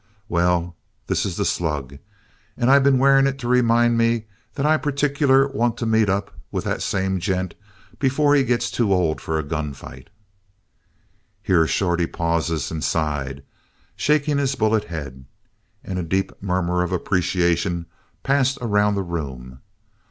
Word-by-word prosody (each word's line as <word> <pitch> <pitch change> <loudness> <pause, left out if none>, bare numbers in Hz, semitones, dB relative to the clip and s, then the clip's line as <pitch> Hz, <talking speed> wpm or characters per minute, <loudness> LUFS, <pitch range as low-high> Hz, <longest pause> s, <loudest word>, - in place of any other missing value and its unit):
"'Well, 85 0 0 0.3
this - - 0
is - - -5
the - - 0
slug. 70 -5 -2 0.6
And 120 +1 +2
I 140 - +7
been 135 -1 +4
wearing 135 +1 +5
it 135 0 -2
to 125 -3 -6
remind 120 -1 +3
me 115 -1 +1 0.3
that 140 -1 -1
I 155 +1 +4
particular 140 -2 +2
want 120 -3 -1
to 115 - -3
meet 110 -2 +2
up 100 +1 -1 0.2
with - - -2
that - - -2
same 95 -1 -1
gent 95 -1 -2 0.5
before 145 +2 +2
he 140 -2 +4
gets 120 -1 0
too 115 -5 0
old 90 -5 +1
for 80 - -2
a 80 - -1
gunfight!'" 70 -4 -6 1.3
Here 80 -3 +3
Shorty 85 -2 0
paused 85 -3 -1
and 80 -2 -4
sighed, 70 -3 -2 0.5
shaking 150 -1 +1
his 135 -1 0
bullet 110 -2 +1
head. 70 -6 -7 0.6
And 95 -1 -4
a - - -2
deep 95 +4 -1
murmur 90 -2 0
of 90 - -2
appreciation 85 -1 0 0.4
passed 135 -1 +2
around 105 -3 +1
the 100 - -1
room. 65 -7 -6
95 Hz, 150 wpm, -22 LUFS, 85-125 Hz, 1.3 s, I